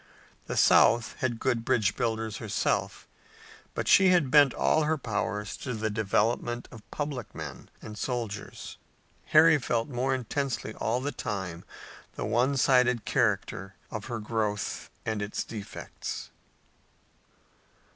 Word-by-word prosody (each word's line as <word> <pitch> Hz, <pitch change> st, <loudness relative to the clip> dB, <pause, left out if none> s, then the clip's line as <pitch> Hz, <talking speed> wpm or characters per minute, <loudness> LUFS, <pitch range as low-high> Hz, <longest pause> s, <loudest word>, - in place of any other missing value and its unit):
The -, -, -3 dB
South 115 Hz, +1 st, +5 dB
had 120 Hz, -3 st, -1 dB
good 120 Hz, -3 st, 0 dB
bridge 115 Hz, -5 st, +2 dB
builders 110 Hz, -2 st, -2 dB
herself, 110 Hz, -3 st, -1 dB, 0.7 s
but -, -, -2 dB
she 195 Hz, -, +7 dB
had 170 Hz, -8 st, +3 dB
bent 145 Hz, -3 st, +7 dB
all 155 Hz, -, +2 dB
her 160 Hz, +1 st, +1 dB
powers 105 Hz, -4 st, -3 dB
to 125 Hz, -3 st, -4 dB
the 110 Hz, 0 st, -2 dB
development 110 Hz, +3 st, 0 dB
of 115 Hz, -4 st, -13 dB
public 145 Hz, -7 st, -5 dB
men -, -, -8 dB
and 105 Hz, -, -8 dB
soldiers. 115 Hz, -3 st, -5 dB, 0.5 s
Harry 155 Hz, 0 st, +6 dB
felt 120 Hz, -1 st, -1 dB
more 130 Hz, +1 st, 0 dB
intensely 130 Hz, -2 st, -3 dB
all 115 Hz, +4 st, -1 dB
the 145 Hz, +2 st, -2 dB
time 95 Hz, -9 st, -4 dB, 0.5 s
the -, -, -3 dB
one 130 Hz, +4 st, +2 dB
sided 125 Hz, -3 st, +3 dB
character 100 Hz, -5 st, 0 dB, 0.2 s
of 110 Hz, -1 st, -5 dB
her 120 Hz, -2 st, -4 dB
growth 105 Hz, -2 st, -2 dB, 0.2 s
and 110 Hz, -2 st, -1 dB
its 105 Hz, +1 st, -3 dB
defects. 105 Hz, -3 st, -7 dB
115 Hz, 130 wpm, -28 LUFS, 105-130 Hz, 0.7 s, she